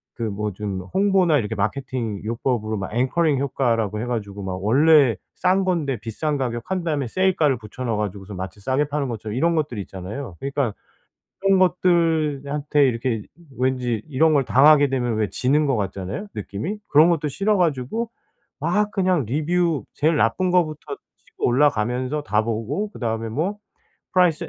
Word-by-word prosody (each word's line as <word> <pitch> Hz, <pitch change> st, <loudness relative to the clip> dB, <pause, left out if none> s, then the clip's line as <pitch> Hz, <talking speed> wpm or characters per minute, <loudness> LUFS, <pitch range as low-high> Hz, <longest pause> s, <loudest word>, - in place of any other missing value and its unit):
그 115 Hz, -, -5 dB
뭐 105 Hz, 0 st, -2 dB
좀 100 Hz, -1 st, -4 dB
홍보나 190 Hz, -5 st, +4 dB
이렇게 110 Hz, 0 st, -3 dB
마케팅 110 Hz, 0 st, -2 dB
요법으로 115 Hz, -1 st, -1 dB
막 95 Hz, -1 st, -5 dB
앵커링 140 Hz, +4 st, +2 dB
효과라고 115 Hz, -6 st, 0 dB
해 -, -, -3 dB
가지고 105 Hz, -4 st, -4 dB
막 95 Hz, -1 st, -3 dB
원래 140 Hz, +1 st, +5 dB, 0.2 s
싼 185 Hz, +2 st, +2 dB
건데 155 Hz, -8 st, 0 dB
비싼 145 Hz, +6 st, -2 dB
가격 120 Hz, -3 st, -2 dB
한 185 Hz, -2 st, 0 dB
다음에 150 Hz, -5 st, -1 dB
세일가를 165 Hz, -4 st, +2 dB
붙여 110 Hz, +3 st, -8 dB
넣어 115 Hz, -2 st, 0 dB
가지고서 100 Hz, -1 st, -4 dB
마치 95 Hz, +2 st, -6 dB
싸게 130 Hz, +7 st, +1 dB
파는 145 Hz, -3 st, -1 dB
것처럼 110 Hz, -1 st, -5 dB
이런 170 Hz, +6 st, +2 dB
것들이 145 Hz, -9 st, -1 dB
있잖아요. 95 Hz, +3 st, -7 dB
그러니까는 140 Hz, -4 st, -1 dB, 0.7 s
그런 195 Hz, -1 st, +3 dB
것들한테 155 Hz, -5 st, +2 dB
이렇게 115 Hz, -2 st, -1 dB, 0.4 s
왠지 125 Hz, -3 st, 0 dB
이런 155 Hz, +2 st, +3 dB
걸 140 Hz, -, +3 dB
당하게 145 Hz, +3 st, +6 dB
되면 120 Hz, -4 st, -1 dB
왜 110 Hz, -1 st, 0 dB
지는 145 Hz, +4 st, +1 dB
것 135 Hz, -4 st, +1 dB
같잖아요, 100 Hz, -, -4 dB
느낌이? 105 Hz, -, -4 dB
그런 155 Hz, +3 st, +6 dB
것도 160 Hz, -3 st, 0 dB
싫어 200 Hz, +9 st, +1 dB
가지고 175 Hz, -, 0 dB, 0.5 s
막 205 Hz, +7 st, +1 dB
그냥 185 Hz, -, +1 dB
리뷰 160 Hz, +4 st, 0 dB
제일 155 Hz, +3 st, +2 dB
나쁜 130 Hz, +10 st, +2 dB
거부터 155 Hz, -4 st, 0 dB, 0.3 s
치고 -, -, -7 dB
올라가면서 130 Hz, +1 st, +1 dB
다 105 Hz, -3 st, +1 dB
보고 115 Hz, -, -2 dB
그다음에 115 Hz, -, -3 dB
뭐 165 Hz, -, -2 dB, 0.6 s
price 180 Hz, -4 st, +3 dB
135 Hz, 365 characters per minute, -22 LUFS, 110-160 Hz, 0.7 s, 당하게